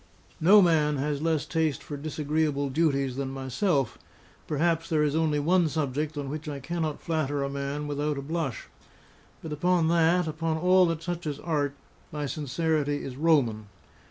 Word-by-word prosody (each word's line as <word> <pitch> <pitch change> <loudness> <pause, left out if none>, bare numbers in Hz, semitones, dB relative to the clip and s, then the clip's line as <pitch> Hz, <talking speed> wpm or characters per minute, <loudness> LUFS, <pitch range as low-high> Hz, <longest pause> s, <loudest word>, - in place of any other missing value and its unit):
No 195 +5 +7
man 155 -4 +3
has 145 +1 -2
less 160 -2 0
taste 160 -4 -1
for 145 - -6
disagreeable 150 -1 -1
duties 140 -4 +1
than 135 -1 -2
myself; 135 - -1 0.5
perhaps 165 +2 0
there 155 -2 +2
is 150 0 +1
only 160 -2 +2
one 170 +2 +3
subject 150 0 -2
on 145 -1 -3
which 155 +2 -5
I 140 -1 -5
cannot 160 +1 -3
flatter 145 -4 -1
a 140 - -2
man 140 +1 -3
without 145 0 -1
a 140 - -4
blush; 150 -5 -3 0.8
but 155 - -5
upon 170 +1 +2
that, 170 +1 +3
upon 160 +1 -1
all 180 +2 +5
that 165 -1 -2
touches 165 -4 -4
art, 145 -4 -1 0.4
my 150 -1 -3
sincerity 145 +1 -1
is 130 - -6
Roman. 130 -9 +2
150 Hz, 160 wpm, -27 LUFS, 140-165 Hz, 0.8 s, No